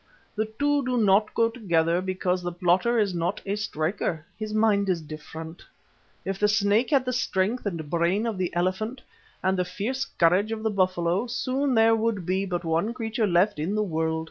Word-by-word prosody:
The 215 +1 0
two 290 0 +2
do 250 -1 -1
not 210 -1 +3
go 230 - +4
together 170 -7 +1
because 185 -1 -1
the 175 0 -3
plotter 180 +7 +2
is 205 -4 +1
not 175 +2 -1
a 200 +1 -1
striker. 165 -4 -2
His 215 0 -5
mind 210 -2 +2
is 180 -2 +1
different. 160 +2 -9 0.6
If 195 0 -3
the 210 - +4
snake 210 +3 +2
had 275 -4 +3
the 255 - -1
strength 215 -1 0
and 165 -6 -4
brain 170 +7 +1
of 220 -5 -3
the 180 -2 -1
elephant, 190 +8 -1 0.4
and 190 0 +1
the - - +3
fierce 235 +9 -3
courage 185 +6 +2
of 220 -1 -4
the 220 - +1
buffalo, 185 +1 +1
soon 260 +3 -1
there 225 0 +5
would 220 -5 -1
be 190 +2 0
but 175 -1 -2
one 165 +9 0
creature 225 -2 -1
left 180 0 +2
in 175 +7 -1
the 215 - +1
world. 160 -3 -1
195 Hz, 195 wpm, -26 LUFS, 175-225 Hz, 0.6 s, there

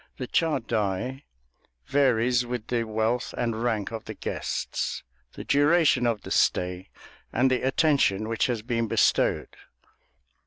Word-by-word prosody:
The 130 - -4
chadai 125 - -1 0.6
varies 125 -3 +2
with 120 -2 -5
the 120 -2 0
wealth 110 +1 -1
and 115 -2 -1
rank 115 -4 -1
of 115 - -6
the - - -7
guests, - - -3 0.3
the - - -8
duration 145 -3 +3
of 115 -3 -1
the - - -9
stay, 90 +1 +1 0.4
and 130 +3 +2
the 130 - +1
attention 135 -7 +2
which 115 0 0
has 120 -4 -2
been 115 -1 -1
bestowed. - - +1
120 Hz, 130 wpm, -26 LUFS, 110-130 Hz, 0.6 s, duration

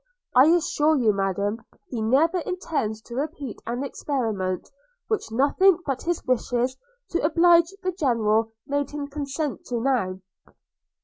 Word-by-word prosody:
I 255 +3 +7
assure 315 -2 +3
you, 225 -5 +3
Madam, 200 +3 -1 0.3
he 235 -4 -3
never 300 +11 +3
intends 315 - -3
to 235 - -11
repeat 280 -2 -4
an 240 +3 -2
experiment, 220 -10 -2 0.4
which 435 - -1
nothing 290 +10 +4
but 270 -3 -2
his 345 0 -2
wishes 250 0 0 0.4
to 340 - 0
oblige 340 +2 +5
the 370 - 0
General 225 - +1
made 285 0 -1
him 295 -1 -4
consent 285 0 -4
to 240 -2 -2
now.' 225 -8 0
270 Hz, 135 wpm, -25 LUFS, 225-315 Hz, 0.4 s, I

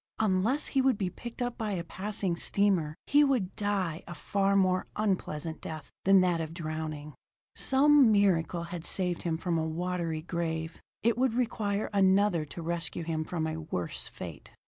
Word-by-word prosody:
Unless 220 +7 +2
he 270 - +2
would 260 -4 +3
be 185 -3 -1
picked 240 +6 -6
up 245 0 -4
by 215 -2 -1
a 175 -3 -2
passing 190 +1 -2
steamer, 175 -4 +1
he 290 +1 +5
would 250 -10 +1
die 195 -5 -1
a 175 - -7
far 200 0 +1
more 185 -1 +2
unpleasant 170 -6 -2
death 155 -2 -7
than 195 0 +7
that 175 -2 +2
of 160 +1 -5
drowning. 155 -2 -5 0.4
Some 275 -2 +5
miracle 180 -4 +2
had 170 -1 -6
saved 180 -1 -1
him 165 -2 -1
from 170 0 -1
a 160 - -1
watery 170 -1 -2
grave; 165 -1 -3 0.2
it 235 +1 +2
would 255 -3 +2
require 215 -4 0
another 195 -3 +3
to 165 +3 -8
rescue 170 0 -3
him 160 -1 -2
from 160 0 -3
a 160 0 -3
worse 90 - -3
fate. - - -9
180 Hz, 170 wpm, -30 LUFS, 165-205 Hz, 0.4 s, than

